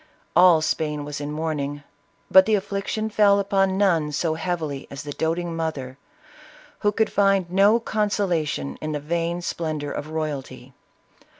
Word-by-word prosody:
All 175 -2 +6
Spain 150 -2 -1
was 145 0 -5
in 145 0 -4
mourning, 150 -2 -3 0.5
but 190 +1 +8
the 220 - +4
affliction 200 +2 -2
fell 205 -1 +4
upon 195 -1 +1
none 170 -7 +2
so 155 +2 0
heavily 160 -4 -3
as 140 - -7
the 145 - -6
doting 165 +2 -2
mother, 150 -6 -4 0.8
who 205 - +2
could 220 +1 0
find 195 -3 +2
no 200 +5 +5
con 215 -2 -1
solation 160 - -1
in 155 0 -3
the 150 - -2
vain 170 +3 -2
splendor 155 -4 -3
of 150 - -5
royalty. 140 -5 -5
165 Hz, 155 wpm, -23 LUFS, 150-195 Hz, 0.8 s, but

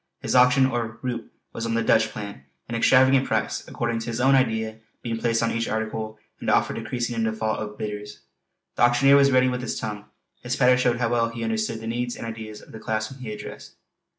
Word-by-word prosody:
His - - -3
auction 125 +1 +6
or 115 -4 -2
"roup" 120 -3 -4 0.2
was 115 0 -3
on 115 - -1
the 115 - +1
"Dutch" 110 -1 +3
plan; 100 -9 -8 0.2
an 115 - -6
extravagant 130 +3 +4
price, - - -1
according 115 -1 -2
to 115 - -6
his 115 0 -3
own 135 +2 +4
idea, 110 -4 +1 0.2
being 115 -1 -3
placed 115 0 +1
on 115 - +1
each 115 0 -1
article, 110 0 -3 0.2
and - - -3
the - - +5
offer - - +1
decreasing 120 +1 -3
in 115 - 0
default 110 0 -1
of 105 -1 -6
bidders. 105 -6 -6 0.6
The - - -2
auctioneer 120 +3 +6
was 140 0 +6
ready 130 -1 +4
with 125 -1 -1
his 125 - -3
tongue; 105 -1 -5 0.4
his 125 0 -2
patter 125 -1 +5
showed 125 -2 +2
how 120 -1 0
well 115 -1 +1
he 115 0 -6
understood 110 0 -2
the - - -7
needs 120 +2 -2
and - - -7
ideas 110 -2 -7
of - - -16
the 110 - -9
class 110 0 -2
whom 135 - -12
he 120 -4 -6
addressed. 105 - -9
115 Hz, 230 wpm, -24 LUFS, 110-125 Hz, 0.6 s, auction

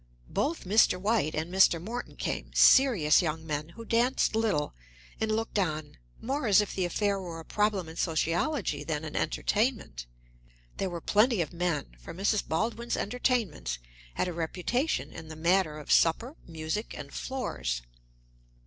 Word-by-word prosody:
Both 315 +4 -1
Mr. 195 -1 +4
White 200 -6 +1
and 160 +4 -3
Mr. 190 -3 +5
Morton 230 +8 -6
came, - - -3
serious 220 - +6
young 160 -1 -3
men 150 0 -3
who 230 +6 -11
danced 235 0 +2
little, 210 -10 0 0.5
and 220 0 0
looked 220 -1 -1
on 155 - -2 0.2
more 270 0 -2
as 205 -1 +6
if 210 - 0
the 185 - 0
affair 200 +2 0
were 170 -3 -6
a 165 - -10
problem 210 -4 0
in 160 +1 -10
sociology 165 - 0
than 150 0 -3
an 155 - -7
entertainment. 205 - -1 0.7
There 195 - -1
were 170 -1 -5
plenty 215 +4 +3
of 170 0 -2
men, 170 -4 -1
for 165 - -9
Mrs. 200 +3 0
Baldwin's 230 +7 -1
entertainments 205 - -1 0.4
had - - 0
a 180 - -3
reputation 180 - -1
in 160 0 -9
the 160 - -8
matter 170 -1 +2
of 150 - -6
supper, 230 - +3
music, 165 +6 -4
and 140 -1 -9
floors. - - -3
185 Hz, 160 wpm, -29 LUFS, 160-225 Hz, 0.7 s, serious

